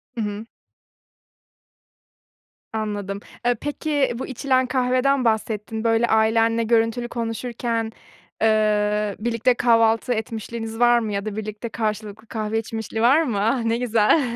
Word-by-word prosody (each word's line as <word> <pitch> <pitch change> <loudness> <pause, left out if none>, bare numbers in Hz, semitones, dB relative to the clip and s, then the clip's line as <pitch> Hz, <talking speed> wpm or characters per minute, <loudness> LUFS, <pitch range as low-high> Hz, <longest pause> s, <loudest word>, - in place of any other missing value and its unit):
Hı 230 - -2
hı. 210 +1 -4 2.3
Anladım. 205 -2 -3 0.3
Eee, 245 0 +3
peki 290 -2 0
bu - - -4
içilen 260 0 +1
kahveden 255 +1 +1
bahsettin, 220 0 -1
böyle 230 +1 +3
ailenle 225 +1 +3
görüntülü 230 +1 +1
konuşurken, 230 -1 -3 0.5
ııı, 210 -1 +2
birlikte 235 +2 +1
kahvaltı 230 0 +3
etmişliğiniz 225 +1 -5
var 240 0 +5
mı 215 -3 -3
ya 200 +1 -2
da 210 -1 -4
birlikte 215 +2 -5
karşılıklı 215 -1 -4
kahve 220 -1 -2
içmişliği 225 0 -4
var 270 +7 +5
mı? 230 -10 -1
Ah, 230 +3 +1
ne 230 0 +1
güzel. 235 +4 +3
225 Hz, 125 wpm, -23 LUFS, 215-240 Hz, 2.3 s, var